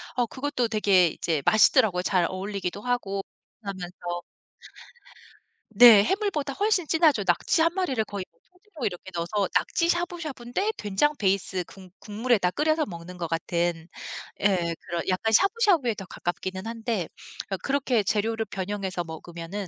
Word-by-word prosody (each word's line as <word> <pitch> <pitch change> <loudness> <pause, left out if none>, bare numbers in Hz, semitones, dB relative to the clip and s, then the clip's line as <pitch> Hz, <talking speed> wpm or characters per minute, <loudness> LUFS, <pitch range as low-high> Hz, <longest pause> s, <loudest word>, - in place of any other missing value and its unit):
어 245 - +2
그것도 260 0 -2
되게 200 -5 +4
이제 160 -1 -2
맛있더라고요 210 -3 +4
잘 180 -1 +2
어울리기도 195 0 -4
하고 210 -5 -1 0.4
하면서. 175 -3 -6 1.5
네. 225 -1 +9
해물보다 320 - -1
훨씬 395 -4 +1
진하죠. 315 -9 +3
낙지 175 - +2
1 335 +1 +3
마리를 345 - 0
거의 200 -2 -5
뭐 - - -36
통째로 360 - -9
이렇게 190 0 -4
넣어서 185 +4 -1
낙지 335 0 +1
샤브샤브인데 345 - -2
된장 210 +9 +1
베이스 190 -2 0
국 190 -2 -14
국물에다 210 -3 0
끓여서 310 - +1
먹는 175 -3 -9
것 170 -1 -3
같은 170 0 -1 0.5
예. 180 -4 +1
그런 170 -1 -3
약간 205 +4 0
샤브샤브에 375 - +3
더 195 - -8
가깝기는 185 +2 -4
한데 225 -5 -2 0.4
어 195 - -2
그렇게 260 -2 0
재료를 220 +3 0
변형해서 190 -2 -3
먹으면은 170 +4 -7
205 Hz, 335 characters per minute, -26 LUFS, 180-270 Hz, 1.5 s, 네